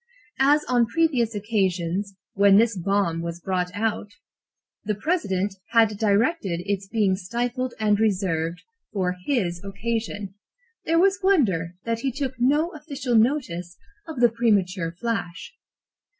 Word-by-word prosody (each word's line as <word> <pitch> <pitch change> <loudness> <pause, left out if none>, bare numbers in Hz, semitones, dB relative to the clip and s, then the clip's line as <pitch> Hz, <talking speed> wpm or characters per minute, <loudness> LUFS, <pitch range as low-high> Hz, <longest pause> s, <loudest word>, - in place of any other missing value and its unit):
As 290 +3 +4
on 245 -2 +3
previous 250 -6 +1
occasions, 195 -2 -1 0.2
when 200 0 +5
this 225 0 +3
bomb 185 -2 0
was 170 0 -5
brought 180 0 -1
out, 215 0 -1 0.8
the 210 0 -1
President 205 - -1 0.2
had 225 -2 +6
directed 205 - +1
its 200 -1 -2
being 200 -3 +1
stifled 240 +6 -3
and 210 -1 +2
reserved 180 -6 0 0.3
for 185 -3 -1
his 185 -11 0
occasion, 205 -1 -4 0.5
there 330 +1 +2
was 385 +2 +4
wonder 195 - +2
that 230 0 -1
he 270 +2 -1
took 270 0 -3
no 295 +7 +2
official 285 -5 -4
notice 220 - +1 0.3
of 310 -6 -5
the 240 - +6
premature 200 -7 +1
flash. 185 - -4
210 Hz, 130 wpm, -24 LUFS, 185-245 Hz, 0.8 s, had